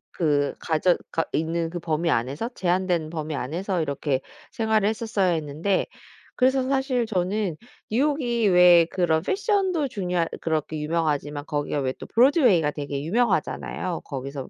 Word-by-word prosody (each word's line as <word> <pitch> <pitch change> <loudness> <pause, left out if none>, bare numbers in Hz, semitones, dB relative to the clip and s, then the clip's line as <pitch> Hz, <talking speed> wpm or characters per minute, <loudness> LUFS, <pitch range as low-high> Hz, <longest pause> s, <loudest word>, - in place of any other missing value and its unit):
그 145 -4 +1
가져가 165 0 0
있는 165 +1 -1
그 175 - -4
범위 165 0 0
안에서 135 - -1
제한된 180 -6 0
범위 155 -1 -4
안에서 170 +7 -2
이렇게 140 -2 -1 0.3
생활을 220 -2 +1
했었어야 220 -4 0
했는데 160 +4 -1 0.5
그래서 260 +1 +3
사실 265 -3 0
저는 190 -3 -1 0.3
뉴욕이 245 -2 +1
왜 180 -2 +7
그런 165 -3 +1
패션도 385 - 0
중요하 180 -6 -1
그렇게 155 -1 -2
유명하지만 150 -2 -1
거기가 145 0 -2
왜 130 -1 -1
또 - - -7
브로드웨이가 240 - +4
되게 145 -1 -4
유명하잖아요. 185 -2 -1
거기서 135 0 -6
175 Hz, 340 characters per minute, -24 LUFS, 150-220 Hz, 0.5 s, 왜